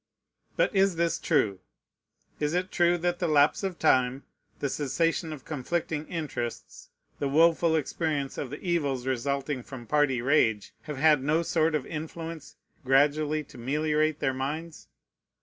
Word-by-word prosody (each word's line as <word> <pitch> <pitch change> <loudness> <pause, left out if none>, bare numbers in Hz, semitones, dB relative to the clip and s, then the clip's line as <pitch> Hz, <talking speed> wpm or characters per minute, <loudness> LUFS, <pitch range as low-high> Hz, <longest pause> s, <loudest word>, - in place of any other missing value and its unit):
But - - +1
is 195 -2 +3
this 170 0 0
true? 105 - +1 0.8
Is 150 +2 0
it 185 +1 -1
true 175 0 +3
that 175 +1 -1
the 175 - 0
lapse 150 -1 +4
of 190 -3 -3
time, 130 -3 +2 0.3
the 145 - -2
cessation 160 +4 -1
of 145 -4 -8
conflicting 155 +1 -3
interests, 135 -8 -5 0.3
the 140 - 0
woful 165 +3 +4
experience 150 -2 -2
of 135 - -4
the 145 - -7
evils 145 -8 -1
resulting 135 +1 -1
from 120 -1 -10
party 145 -1 +2
rage, 115 -5 +2 0.2
have 150 - -4
had 150 -1 +4
no 155 +5 +1
sort 160 -1 +1
of 145 - -1
influence 160 0 -7 0.3
gradually 145 +3 +2
to 130 - -14
meliorate 150 +4 0
their 135 -3 0
minds? 150 +5 -5
150 Hz, 150 wpm, -28 LUFS, 135-165 Hz, 0.8 s, lapse